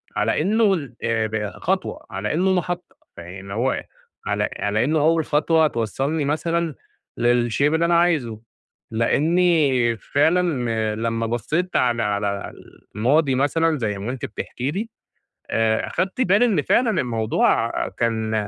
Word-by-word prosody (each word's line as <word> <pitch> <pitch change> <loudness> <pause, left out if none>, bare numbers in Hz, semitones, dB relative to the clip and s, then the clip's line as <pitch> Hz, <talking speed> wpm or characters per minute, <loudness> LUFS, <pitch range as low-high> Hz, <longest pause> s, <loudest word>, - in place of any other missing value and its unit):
على - - +1
إنه 205 +3 +3
ل 145 -7 -7
ب 110 -2 -1
خطوة 190 +1 -2
على 100 +2 -3
إنه 185 +4 +2
محطة، 180 0 -3 0.2
فيعني 95 +3 -9
هو 120 +5 -1 0.4
على - - 0
على 105 +2 0
إنه 155 +4 +1
أول 160 +1 +2
خطوة 155 +2 +3
توصّلني 140 +5 -2
مثلًا 165 +1 -1 0.4
للshape 120 0 +1
اللي 165 +1 +2
أنا 170 0 +4
عايزه؛ 125 -11 -1 0.5
لأني 140 -1 +2
فعلًا 125 - 0
لمّا 115 +1 -1
بصيت 120 - -2
على 120 -2 +2
على 100 -1 -2 0.4
الماضي 135 +5 +2
مثلًا 155 +4 +1
زي 105 -5 -2
ما 100 +5 -4
أنتِ 130 +1 -5
بتحكي 125 +2 -4
لي 210 +7 -4 0.6
آآ، 110 -1 +1
أخدت 190 +7 -2
بالي 205 +1 +4
إن 200 -10 +2
فعلًا 235 - +2
الموضوع 115 -4 +1 0.2
كان 110 -1 -2
135 Hz, 135 wpm, -22 LUFS, 115-165 Hz, 0.6 s, أنا